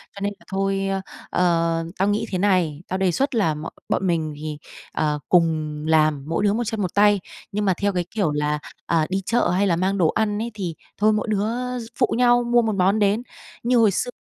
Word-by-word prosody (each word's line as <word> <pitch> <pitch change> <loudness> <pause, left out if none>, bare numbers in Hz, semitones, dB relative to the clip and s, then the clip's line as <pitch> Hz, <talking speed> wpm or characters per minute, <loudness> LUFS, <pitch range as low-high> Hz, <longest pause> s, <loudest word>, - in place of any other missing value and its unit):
Cho - - -8
nên 205 +1 -1
là - - -21
thôi, 195 0 0
ơ, 195 0 -1 0.3
ờ, 165 -2 +1
tao 195 - +2
nghĩ 205 +1 +1
thế 185 - 0
này, 180 -6 +1
tao 185 - -2
đề 190 -1 +2
xuất 270 - 0
là 200 -9 +2
mọi 155 +2 -6 0.2
bọn 190 - 0
mình 160 -3 0
thì, 150 0 -5 0.4
ờ, 150 -1 0
cùng 155 -3 +2
làm, 155 -3 +3
mỗi 165 +5 -1
đứa 205 -1 +3
một 235 +3 0
chân 220 -2 -3
một 180 - -2
tay, 205 0 +4 0.3
nhưng 210 +1 -1
mà, 190 - +3
theo 200 0 +1
cái 180 -1 -1
kiểu, 200 -9 0
là, 150 0 0 0.3
à, 165 -2 +2
đi 190 +1 -1
chợ 240 +4 +2
hay 190 +3 +2
là 175 - +2
mang 190 +3 0
đồ 175 -4 +4
ăn 210 -1 0
ấy 235 +1 -3
thì 185 -6 -4 0.2
thôi 215 +1 +3
mỗi 210 +1 -1
đứa 205 0 +1 0.5
phụ - - +2
nhau 245 0 +4
mua 240 0 +3
một 220 -2 -1
món 195 +3 +2
đến." 205 +3 +2 0.4
Như 245 +1 +3
hồi 225 -3 +5
xưa 245 +6 -2
195 Hz, 230 wpm, -23 LUFS, 165-210 Hz, 0.5 s, hồi